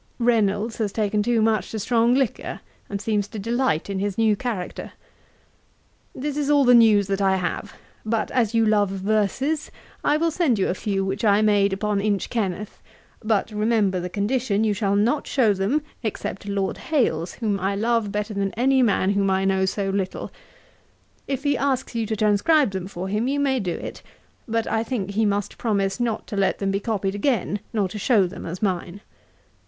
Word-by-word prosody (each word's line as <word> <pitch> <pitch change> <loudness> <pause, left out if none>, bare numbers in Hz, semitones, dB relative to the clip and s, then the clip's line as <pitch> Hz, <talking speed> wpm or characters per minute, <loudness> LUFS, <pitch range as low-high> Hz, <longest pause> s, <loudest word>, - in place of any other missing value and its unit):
'Reynolds 220 -2 +1
has 210 -3 0
taken 210 0 0
too 230 0 +2
much 215 -4 +1
to 220 - -4
strong 230 +3 +2
liquor, 265 -4 -1 0.3
and 200 - -3
seems 210 -1 -1
to 220 - -9
delight 230 -5 0
in 195 -1 -3
his 200 -1 -2
new 220 -2 +3
character. 205 -5 -5 1.2
'This 290 +2 -3
is 290 -1 -1
all 290 -1 +5
the 250 -1 +6
news 220 -4 +6
that 195 +1 -2
I 190 -1 +3
have; 180 -2 -3 0.3
but 220 0 -1
as 230 -3 +1
you 225 0 +4
love 210 -2 +3
verses, 215 - -1 0.3
I 295 - +3
will 330 +1 +1
send 305 -8 +1
you 190 - +1
a - - +1
few 195 0 -2
which 195 +3 -3
I 210 0 +4
made 205 -2 +3
upon 200 +1 -1
Inchkenneth; 205 -1 -2 0.4
but 215 0 0
remember 210 -3 +1
the 180 +1 -4
condition, 210 +2 0
you 215 -2 +2
shall 200 -1 0
not 235 +9 +1
show 230 -7 +3
them, 205 +11 0 0.2
except 215 -3 -4
to 200 - -6
Lord 195 -1 -2
Hailes, 180 - 0
whom 210 -4 -1
I 195 +2 -1
love 225 0 0
better 210 +1 -3
than 200 -1 -1
any 265 +2 +3
man 200 -4 +2
whom 200 -1 +1
I 190 0 +1
know 190 0 +2
so 195 0 -1
little. 195 -1 -3 1.0
If 270 -1 -3
he 285 -1 +2
asks 270 -2 -1
you 230 -2 -1
to 220 - -1
transcribe 215 +6 +3
them 190 -1 -4
for 185 -1 -5
him, 210 +5 -1
you 280 +2 0
may 270 -2 +1
do 180 -5 -2
it, - - -7 0.5
but 230 0 0
I 220 0 0
think 220 -5 -3
he 215 +1 +1
must 205 -1 -2
promise 200 -3 0
not 230 -2 -1
to - - -6
let 195 -1 +1
them 195 -1 -1
be 195 - 0
copied 200 -3 -2
again, 205 -2 0
nor 210 -4 0
to 210 +3 -7
show 205 -2 +3
them 175 - -7
as 180 +5 -6
mine. 185 0 -2
210 Hz, 195 wpm, -23 LUFS, 195-235 Hz, 1.2 s, the